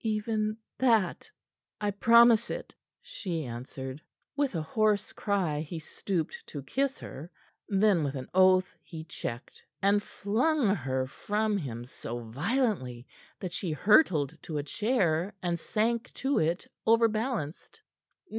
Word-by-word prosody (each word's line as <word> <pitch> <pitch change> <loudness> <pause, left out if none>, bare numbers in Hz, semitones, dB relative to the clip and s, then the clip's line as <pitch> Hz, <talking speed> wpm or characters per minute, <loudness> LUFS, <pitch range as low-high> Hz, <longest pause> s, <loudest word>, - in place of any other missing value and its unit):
"Even 215 0 -1 0.2
that. 225 -8 +2 0.5
I 205 -1 0
promise 235 +2 +6
it," - - -5 0.3
she 170 -7 -4
answered. 130 +3 -7 0.3
With 280 -7 0
a 165 - 0
hoarse 210 +4 +1
cry, 185 -8 0
he 160 +2 -6
stooped 160 +1 -3
to 145 -3 -7
kiss 270 - -1
her; 150 +6 -9 0.4
then, 195 -4 +3
with 140 -1 -2
an 130 -1 -5
oath, 185 0 +5
he 160 -2 -8
checked, 125 -6 -7 0.2
and 200 +1 +3
flung 225 +4 +1
her 130 -3 -1
from 210 +10 -1
him 120 - -4
so 120 -1 -7
violently 130 - -1 0.3
that 180 -3 -5
she 170 -5 -2
hurtled 165 - +4
to 155 - -5
a 145 - -1
chair 195 - 0
and 170 -1 0
sank 230 +6 -1
to 275 +1 +1
it, 165 +3 0 0.2
overbalanced. 225 - +1
190 Hz, 130 wpm, -29 LUFS, 150-220 Hz, 0.5 s, promise